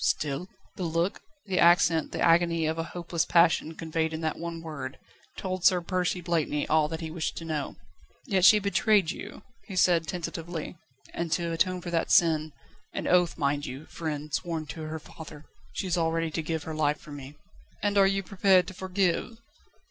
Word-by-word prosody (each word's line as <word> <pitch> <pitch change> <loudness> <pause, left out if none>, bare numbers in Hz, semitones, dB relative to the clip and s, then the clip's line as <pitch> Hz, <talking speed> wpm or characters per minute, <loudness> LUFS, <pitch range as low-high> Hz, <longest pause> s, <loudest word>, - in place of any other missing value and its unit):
"Still?" 150 +4 0 0.3
The 185 - -3
look, 170 +3 -1 0.2
the 190 -3 -1
accent, 170 -2 +4
the - - -4
agony 165 -1 +3
of 160 +1 -1
a 165 - -1
hopeless 170 -1 -1
passion 165 -2 +3
conveyed 160 0 -2
in 160 - -4
that 160 -1 -2
one 165 0 -5
word, 145 -5 -6 0.4
told 185 -2 -4
Sir 185 -2 +5
Percy 180 0 -1
Blakeney 160 -4 -1
all 155 -1 +3
that 160 +2 -5
he 160 -1 -5
wished 160 -1 -3
to 165 - -6
know. 155 -3 -3 0.5
"Yet 190 -2 +1
she 210 +3 +9
betrayed 200 -3 +2
you," - - -9 0.2
he 195 - -7
said 175 -3 +3
tentatively. 170 -1 -5 0.4
"And 170 -1 -3
to 170 0 -1
atone 180 +2 0
for 175 - -6
that 165 -1 0
sin 155 -2 +4 0.4
an - - -3
oath, 180 -2 +3
mind 145 0 0
you, 135 +5 -7
friend, 150 -3 -5
sworn 165 0 -2
to 160 - -8
her 155 +1 -4
father 155 -1 -11 0.3
she - - -3
is 180 -1 0
already 165 0 0
to 165 - -2
give 160 0 -3
her 160 - -5
life 150 -1 +1
for 150 - -13
me." 140 0 -9 0.5
"And 205 0 +1
you 195 0 +4
are - - -15
prepared 190 -1 +3
to - - -9
forgive?" 190 +3 -1
165 Hz, 190 wpm, -28 LUFS, 155-180 Hz, 0.5 s, she